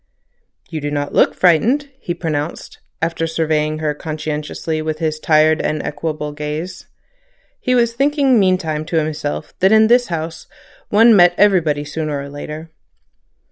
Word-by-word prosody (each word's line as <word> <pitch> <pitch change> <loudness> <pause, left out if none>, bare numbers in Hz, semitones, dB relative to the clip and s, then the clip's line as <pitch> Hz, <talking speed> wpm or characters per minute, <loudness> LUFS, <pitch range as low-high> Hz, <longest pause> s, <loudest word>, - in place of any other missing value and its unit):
"You 155 -2 -4
do 145 - -2
not 145 -1 -3
look - - +3
frightened," 240 - +2
he 175 -8 -4
pronounced, 155 -2 -4 0.2
after 165 0 -1
surveying 155 -1 0
her 155 -1 -1
conscientiously 155 +1 -4
with 155 0 -3
his 155 -1 -2
tired 155 0 +3
and 155 - -1
equable 155 -2 -4
gaze. 150 +4 -6 0.7
He 255 - 0
was 235 -1 +2
thinking 275 -1 +2
meantime 180 -5 +1
to 165 - -4
himself 150 -1 -3
that 190 +2 +4
in 220 0 +6
this 245 +1 +4
house 165 -1 -5 0.4
one 225 +2 +6
met 175 -2 +6
everybody 165 -8 +3
sooner 150 -1 -3
or 140 0 -7
later. 150 +3 -8
160 Hz, 145 wpm, -18 LUFS, 150-185 Hz, 0.7 s, in